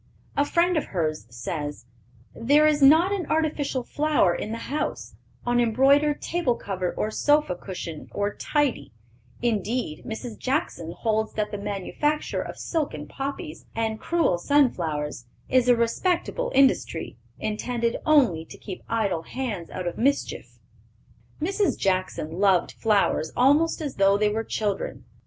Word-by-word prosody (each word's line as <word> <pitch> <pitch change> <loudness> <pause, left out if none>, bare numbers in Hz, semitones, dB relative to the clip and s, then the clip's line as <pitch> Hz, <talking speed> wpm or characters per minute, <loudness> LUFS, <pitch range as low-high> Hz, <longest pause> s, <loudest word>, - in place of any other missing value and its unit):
A 285 - +3
friend 345 +3 +2
of 305 - 0
hers 155 -7 -2
says: 145 +5 -5 0.5
"There 285 +6 +4
is 300 -1 +3
not 320 +7 +6
an 380 -6 -2
artificial 300 -5 0
flower 290 - +2
in 215 - -4
the 230 - -5
house, 300 0 -3 0.3
on 240 0 +2
embroidered 275 +6 +3
table 335 -9 0
cover 185 -4 -3
or 215 - -1
sofa 295 -5 +2
cushion 175 -4 -7
or 205 0 -1
tidy; 275 - -1 0.5
indeed, 225 -5 -1
Mrs. 220 0 -6
Jackson 255 - -2
holds 220 +1 -1
that 210 -1 -2
the 205 - -4
manufacture 205 +10 -1
of - - -7
silken 275 - -3
poppies 280 - -6
and 220 -1 -1
crewel 335 - +1
sun 285 +4 +4
flowers 150 -7 -4 0.2
is 255 -1 +3
a 245 - +7
'respectable 345 - 0
industry,' 270 0 +2 0.2
intended 230 +2 -1
only 255 - +4
to - - -12
keep 190 -3 -8
idle 200 -7 0
hands 210 -4 -5
out 185 - -5
of 175 - -4
mischief." 280 +4 -1 0.8
Mrs. 375 - 0
Jackson 185 -3 -1
loved 195 -3 +3
flowers 205 -7 +1
almost 290 +7 +4
as 290 -3 -4
though 195 0 +4
they 210 0 +2
were 220 +2 -1
children. 210 -3 -3
230 Hz, 145 wpm, -25 LUFS, 195-290 Hz, 0.8 s, a